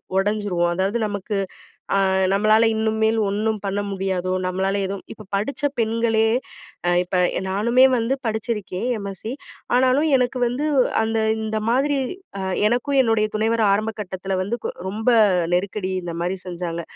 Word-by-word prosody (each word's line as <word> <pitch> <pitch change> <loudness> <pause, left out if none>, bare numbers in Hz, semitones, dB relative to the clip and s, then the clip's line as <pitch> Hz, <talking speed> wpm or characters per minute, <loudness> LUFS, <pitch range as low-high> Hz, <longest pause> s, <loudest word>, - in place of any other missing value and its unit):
உடஞ்சிருவோம். 195 -3 +1
அதாவது 195 +5 0
நமக்கு 205 +1 -4 0.6
அ - - +3 0.3
நம்பளால 215 +3 +4
இனிமேல் 220 0 +1
ஒன்ணும் 215 +2 -1
பண்ண 200 +1 -1
முடியாதோ? 190 -2 -2
நம்பளால 190 +2 0
எதும் 195 0 -5
இப்ப 215 - -12
படிச்ச 215 +8 -3 0.2
பெண்களே 225 0 +2 0.6
அ - - +4
இப்ப 180 +1 -3 0.2
எ - - -2
நானுமே 235 +6 +4
வந்து 235 +2 0
படிச்சிருக்கேன் 220 -2 -3
எம்.எஸ்சி. 200 +2 -6 0.4
ஆனாலும் 260 +5 +3
எனக்கு 250 0 0
வந்து 250 +5 -2 0.4
அந்த 225 0 0 0.3
இந்த 220 0 -1
மாதிரி 280 +4 +2 0.4
அ - - -4 0.3
எனக்கும் 250 +4 0
என்னுடைய 225 -3 +2
துணைவர் 225 +1 +1
ஆரம்ப 215 +2 0
கட்டத்தில 190 -1 -3
வந்து 220 +6 -2
கு - - -1 0.2
ரொம்ப 220 +4 -3 0.5
நெருக்கடி 190 +1 -1
இந்தமாரி 175 +2 -3
செஞ்சாங்க. 170 -1 -4
215 Hz, 140 wpm, -22 LUFS, 190-225 Hz, 0.6 s, நம்பளால